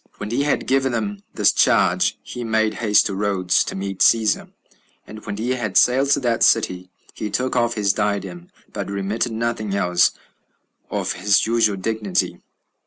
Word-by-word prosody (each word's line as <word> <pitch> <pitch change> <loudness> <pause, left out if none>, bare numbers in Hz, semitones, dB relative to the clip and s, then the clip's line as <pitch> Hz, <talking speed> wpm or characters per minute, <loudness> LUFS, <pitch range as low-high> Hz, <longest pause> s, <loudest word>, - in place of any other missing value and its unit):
6. - - -32
When 105 +1 -5
he 125 +4 0
had 145 0 0
given 135 -1 +1
them 105 -3 -3
this - - +4
charge, - - +2
he 125 - -7
made 110 -1 0
haste 105 -3 +2
to 100 - -2
Rhodes, 95 -2 +1
to - - -5
meet 95 0 -5
Cæsar; 110 -3 +2 0.5
and 110 0 -11
when 100 - -4
he 120 +4 -2
had 120 -6 -1
sailed 135 +3 +4
to - - +3
that 120 -2 0
city, 90 0 +2 0.2
he 105 - -5
took 130 +5 -2
off 120 -1 +1
his 100 -2 +1
diadem, 100 -4 -3 0.3
but - - -5
remitted 100 +4 -2
nothing 110 -3 -2
else 90 -3 +2 0.8
of - - -2
his 95 +1 +2
usual 115 -3 +2
dignity. 105 0 -2
105 Hz, 175 wpm, -21 LUFS, 100-115 Hz, 0.8 s, this